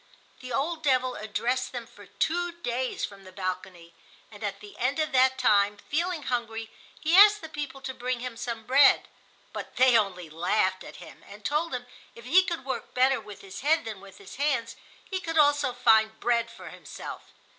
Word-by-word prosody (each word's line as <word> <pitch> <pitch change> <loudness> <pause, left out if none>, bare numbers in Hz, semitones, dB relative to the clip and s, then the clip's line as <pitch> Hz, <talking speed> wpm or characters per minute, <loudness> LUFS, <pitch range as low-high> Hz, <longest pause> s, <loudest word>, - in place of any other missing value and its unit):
The 255 0 -9
old 310 +7 -1
devil 255 -4 +2
addressed 240 +4 -2
them 245 -2 -5
for 225 -3 -16
two 350 +2 -1
days 255 -7 -2
from 200 -1 -12
the 185 - -13
balcony, 185 -2 -5 0.4
and 210 0 -11
at 200 -1 -3
the 205 0 -13
end 255 +5 0
of 310 0 0
that 260 0 +4
time, 205 -4 +3
feeling 330 - -2
hungry, 225 -3 -3 0.3
he 320 +2 +2
asked 415 +2 +8
the 320 - -7
people 290 -3 -6
to 265 -1 -5
bring 250 0 -3
him 250 -1 -5
some 230 -1 -5
bread. 270 +1 +5 0.5
But - - -7
they 255 -1 +5
only 190 -6 +1
laughed 185 +4 0
at - - -11
him - - -13
and 205 +1 -13
told 305 0 0
him 245 0 -5 0.3
if 235 - -13
he 350 +9 +6
could 340 -6 -4
work 265 - -5
better 260 +1 +3
with 210 -2 -11
his 195 -1 -9
head 310 +2 +2
than 215 -4 -6
with 195 -1 -14
his 200 +3 -12
hands 270 -5 0 0.3
he 380 - -3
could 330 -3 -4
also 290 -3 +4
find 220 -3 +3
bread 235 -1 +1
for - - -11
himself. - - -9
250 Hz, 195 wpm, -27 LUFS, 210-290 Hz, 0.5 s, asked